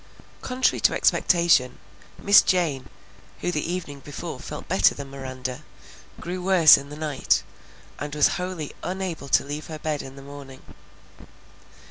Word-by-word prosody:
Contrary 255 0 0
to - - +3
expectation, 170 -8 +3 0.4
Miss 200 +1 +6
Jane, 155 -8 0 0.5
who 175 - -1
the 155 +1 -2
evening 165 -6 -5
before 140 +1 -7
felt - - -8
better - - +3
than 140 -1 -8
Miranda, 130 0 -6 0.6
grew 180 +1 -5
worse 180 -4 +7
in 140 0 -5
the 150 - -8
night, 150 -3 0 0.6
and 145 +1 -5
was 150 - +4
wholly 180 -5 -4
unable 185 -6 -4
to - - +3
leave 145 +2 -6
her 155 - -7
bed 150 -1 -3
in 135 0 -10
the 135 - -12
morning. 140 -2 -11
150 Hz, 145 wpm, -24 LUFS, 140-175 Hz, 0.6 s, worse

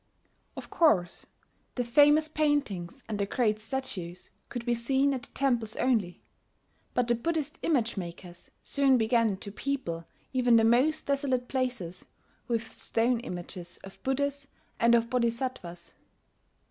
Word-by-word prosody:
Of - - -8
course 185 - +2 0.5
the 245 - 0
famous 295 +5 +5
paintings 280 - -1
and 215 -2 -3
the 200 - 0
great 215 -1 +1
statues 210 -8 -5 0.2
could 240 -1 -5
be 240 - +2
seen 265 +4 +2
at 260 - -3
the - - -13
temples 240 -5 0
only; 215 -9 0 0.7
but 245 -1 +2
the 240 - +3
Buddhist 310 +5 -2
image 240 -9 +1
makers 175 -1 -8
soon 275 -2 +3
began 225 -3 +2
to 200 - -8
people 200 -10 -3 0.3
even 250 -2 +4
the 225 - +6
most 250 +7 +3
desolate 275 -3 0
places 245 -10 -3 0.4
with 230 -2 -2
stone 235 +1 +1
images 175 -5 -7
of 195 - -12
Buddhas 280 +1 -1 0.3
and 235 0 +5
of 230 0 +2
Bodhisattvas. 235 -7 -2
240 Hz, 135 wpm, -29 LUFS, 210-270 Hz, 0.7 s, the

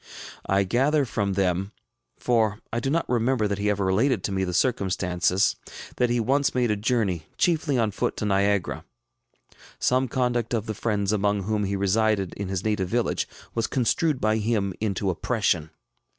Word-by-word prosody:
I 100 +1 +3
gather 135 +9 +2
from 100 -5 -1
them 95 +1 0 0.4
for 110 -4 +1 0.2
I 120 - +1
do 135 - -2
not 165 +4 0
remember 120 -2 +1
that 100 -1 -2
he 105 +1 +1
ever 100 -1 0
related 105 +3 +2
to - - -2
me 95 0 0
the 90 - -2
circumstances 95 -3 +1 0.4
that 125 - +2
he 120 0 +1
once 135 +5 +1
made 120 -3 +2
a - - +2
journey, 100 -7 -1
chiefly 160 -6 +1
on 110 -3 +1
foot, - - -2
to - - -2
Niagara. 100 -1 +1 0.9
Some 130 +1 +2
conduct 120 -1 0
of 110 -2 -2
the 110 - -3
friends 105 -2 -1
among 100 -1 +1
whom 105 +1 -1
he 100 +1 -1
resided 100 -1 +1
in 100 - -5
his 95 0 -3
native 105 -4 0
village 120 +2 0 0.3
was 115 - 0
constructed 135 +4 +1
by 110 -2 +2
him 105 -3 0
into 100 -2 0
oppression. 90 -5 0
105 Hz, 175 wpm, -25 LUFS, 100-120 Hz, 0.9 s, I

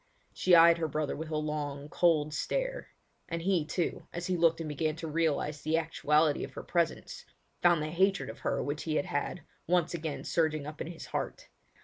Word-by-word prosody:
She 185 -1 +4
eyed 170 0 +7
her 160 - 0
brother 155 -1 -2
with 160 +1 -6
a 155 - -1
long, 150 -2 -3
cold 155 -2 +2
stare; - - -2 0.4
and 170 -1 -3
he, 185 -3 +2
too, 170 +3 -3
as 175 0 -5
he 185 - 0
looked 165 -1 +3
and 165 - -4
began 155 +1 -1
to 165 0 -6
realise 150 -2 0
the 155 +1 +1
actuality 155 -2 +2
of - - -7
her - - -7
presence, 170 -2 -1 0.4
found 175 -3 +4
the 155 - -3
hatred 190 +4 +2
of 110 - -8
her - - -1
which 145 +1 -3
he 155 -2 -1
had 190 - +1
had, 175 0 -3 0.2
once 175 -1 +2
again 155 -5 -4
surging 155 -3 0
up 150 +1 -7
in - - -3
his 170 -1 -8
heart. - - -4
160 Hz, 205 wpm, -30 LUFS, 150-170 Hz, 0.4 s, eyed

